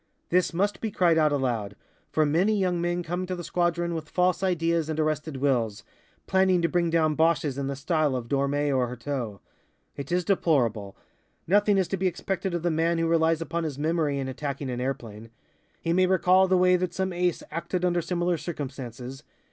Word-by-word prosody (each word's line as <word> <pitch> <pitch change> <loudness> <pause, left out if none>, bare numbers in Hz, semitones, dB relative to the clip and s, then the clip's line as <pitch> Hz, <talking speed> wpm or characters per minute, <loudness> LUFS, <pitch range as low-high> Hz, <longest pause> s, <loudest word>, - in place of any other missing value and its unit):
This 180 0 +2
must 200 +4 -1
be 225 - -1
cried 175 -5 +3
out 155 -1 +3
aloud, 120 -8 -1 0.4
for 155 - +2
many 180 +9 +2
young 180 -3 0
men 175 0 -1
come 180 +2 -3
to 185 - -2
the 175 - -6
squadron 175 0 0
with 160 -1 -5
false 180 +1 +1
ideas 170 -3 0
and 155 0 -2
arrested 155 -1 -1
wills, 120 -6 0 0.4
planning 190 -1 +3
to - - +4
bring 170 +1 +1
down 160 -2 +2
Boches 160 -3 +1
in 140 0 -3
the 140 - -3
style 150 0 0
of 120 -2 -4
Dormé 140 +1 0
or 125 -1 +1
Heurteaux. 120 -4 -5 0.5
It 140 +1 -7
is 180 0 +1
deplorable. 120 - +1 0.5
Nothing 205 +2 +3
is 190 -2 +2
to 195 - -1
be 190 +1 +1
expected 185 +1 -2
of 170 - -3
the 175 - +1
man 165 +2 +1
who 165 - +1
relies 165 0 +2
upon 165 0 -2
his 150 -4 -4
memory 155 -1 0
in 135 -1 -3
attacking 140 0 -4
an 125 0 -3
airplane. 115 -4 -5 0.5
He 165 - -1
may 185 +1 +4
recall 185 +1 +4
the 185 0 +3
way 180 0 +4
that 180 -1 -3
some 190 -1 -1
Ace 175 -1 0
acted 170 +3 -2
under 175 -1 +1
similar 175 0 -1
circumstances. 135 -4 -6
165 Hz, 195 wpm, -26 LUFS, 140-180 Hz, 0.5 s, to